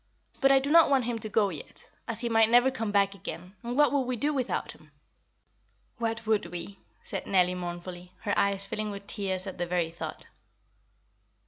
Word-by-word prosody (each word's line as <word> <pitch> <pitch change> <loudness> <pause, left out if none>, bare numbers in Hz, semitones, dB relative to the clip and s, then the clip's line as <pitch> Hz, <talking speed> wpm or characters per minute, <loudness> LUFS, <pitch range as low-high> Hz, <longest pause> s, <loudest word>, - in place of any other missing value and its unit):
But 275 - +5
I 270 - +7
do 275 +2 0
not 330 -1 +7
want 270 -4 +3
him 235 -1 -2
to 215 - -2
go 205 -1 +3
yet, 155 -6 -10 0.2
as 230 -1 -1
he 240 - +1
might 225 -1 +4
never 245 +3 +5
come 225 -4 -3
back 200 -1 +3
again; 185 -1 -8
and 240 +2 -4
what 295 0 +5
would 280 - +3
we 255 - 0
do 290 +6 0
without 260 -3 -2
him?" - - -18 1.1
"What 230 0 -2
would 215 -4 +1
we?" 175 +3 -7 0.2
said - - -5
Nellie 180 -2 +3
mournfully, 175 0 -6
her 205 -2 -1
eyes 200 0 +1
filling 215 +2 -3
with 200 -1 -7
tears 190 -3 -2
at 190 -2 -7
the 175 - -1
very 170 -2 0
thought. 170 - -7
205 Hz, 200 wpm, -28 LUFS, 185-240 Hz, 1.1 s, I